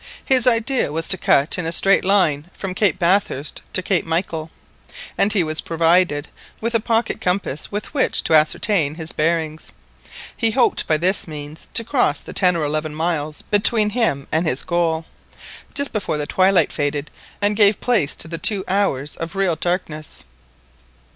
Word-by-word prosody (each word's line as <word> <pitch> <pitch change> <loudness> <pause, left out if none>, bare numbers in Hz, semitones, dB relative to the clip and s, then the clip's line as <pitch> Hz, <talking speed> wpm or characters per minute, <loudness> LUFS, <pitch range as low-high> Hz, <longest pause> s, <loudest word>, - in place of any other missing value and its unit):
His 255 -2 +3
idea 240 - +1
was 165 +2 -3
to - - +6
cut 140 - +3
across 150 - 0
in 170 - -3
a - - -2
straight 195 +3 +3
line 175 -6 +1
from 195 -2 -5
Cape 195 -1 +1
Bathurst 175 -6 0
to 185 - +3
Cape 185 -2 +1
Michael, 165 -1 -3 0.7
and 200 - +2
he 200 -4 +2
was 155 0 -2
provided 165 -2 +1 0.3
with 230 +1 -2
a 230 - +3
pocket 225 +1 -1
compass 180 -5 -2
with 205 +5 -5
which 280 - +1
to - - 0
ascertain 155 0 +2
his 160 -1 -5
bearings. 160 0 -2 0.6
He 230 - +1
hoped 240 +3 +1
by 155 - +2
this 185 +4 +1
means 150 0 -8
to 230 - +5
cross 250 +2 0
the - - -10
ten 180 -2 +3
or 165 - -1
eleven 155 +1 -2
miles 155 -2 -3
between 210 +1 +2
him 205 - -1
and 160 +2 +1
his 130 -3 +2
goal, 165 -2 -1 0.7
just 280 -1 -2
before 200 -7 -2
the 150 - -2
twilight 185 0 +2
faded 145 0 -2 0.3
and 205 +1 +1
gave 205 -1 +4
place 215 - +1
to - - -1
the 165 0 -5
two 200 -3 +2
hours 180 -8 -1
of 165 +3 -6
real 195 -4 +1
darkness. 160 -3 -4
175 Hz, 175 wpm, -20 LUFS, 155-205 Hz, 0.7 s, to